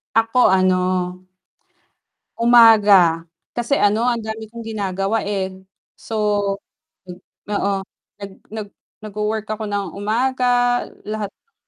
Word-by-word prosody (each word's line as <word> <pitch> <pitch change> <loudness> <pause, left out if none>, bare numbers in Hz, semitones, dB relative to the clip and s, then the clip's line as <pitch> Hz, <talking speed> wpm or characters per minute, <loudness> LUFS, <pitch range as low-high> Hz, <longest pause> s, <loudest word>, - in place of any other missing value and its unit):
Ako, 225 +2 +4
ano 185 -1 +3 1.6
umaga 210 -8 +6 0.3
kasi, 240 +4 0
ano, 210 +3 +2
ang 245 -1 +1
dami 220 0 -7
kong 230 -1 -9
ginagawa 200 0 -2
eh, 200 -2 -2 0.5
so, 225 - -7 1.3
oo 200 -1 0 0.5
nag 200 -1 -8 0.2
nag 215 -2 -5 0.4
nagwo-work 215 +1 -3
ako 215 0 -4
ng 200 -4 -3
umaga, 245 +3 +1 0.2
lahat 210 -2 -4
ng 460 - -54
215 Hz, 105 wpm, -20 LUFS, 200-230 Hz, 1.6 s, umaga